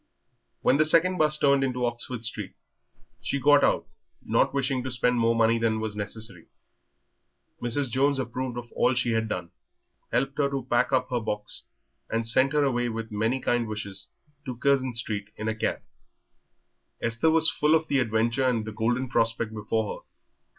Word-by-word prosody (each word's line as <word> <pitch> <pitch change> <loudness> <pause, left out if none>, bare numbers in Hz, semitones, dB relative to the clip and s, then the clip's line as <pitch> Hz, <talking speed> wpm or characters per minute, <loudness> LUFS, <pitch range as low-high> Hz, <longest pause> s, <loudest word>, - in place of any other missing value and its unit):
When 135 - +4
the 155 - +4
second 175 +4 +3
'bus 155 -1 +5
turned 140 -2 +3
into 125 -2 -1
Oxford 120 0 -3
Street 110 -4 -4 0.7
she 140 - -2
got 145 +2 +5
out, - - +2 0.4
not - - +2
wishing 135 -1 -1
to 130 - -4
spend 125 0 0
more 115 0 +2
money 115 0 +3
than 110 -1 0
was 110 -1 -4
necessary. 105 -3 -6 1.1
Mrs. 120 +2 -1
Jones 140 +3 +2
approved 130 -1 -4
of 120 -1 -8
all 130 - +1
she 125 -1 +1
had 115 -1 0
done, 90 -4 -4 0.6
helped 135 +1 -1
her 140 -1 +2
to 135 -3 -4
pack 120 +1 +1
up 130 -1 0
her 125 - +1
box, 105 -2 -5 0.4
and 115 0 -1
sent 130 +5 +2
her 150 -1 +3
away 120 -3 0
with 115 0 -5
many 110 +5 0
kind 120 -2 0
wishes 105 -2 -4 0.4
to 125 -2 -5
Curzon 130 -1 +1
Street 105 -3 -2
in 110 - -5
a 110 - 0
cab. 110 - -3 1.2
Esther 115 +7 +1
was 160 0 +8
full 150 +2 +2
of 160 0 0
the 140 -2 +1
adventure 115 +2 +1
and 115 -4 0
the 110 - -5
golden 120 +4 -1
prospect 115 -2 0
before 110 0 -2
her. - - -38
120 Hz, 180 wpm, -26 LUFS, 110-135 Hz, 1.2 s, was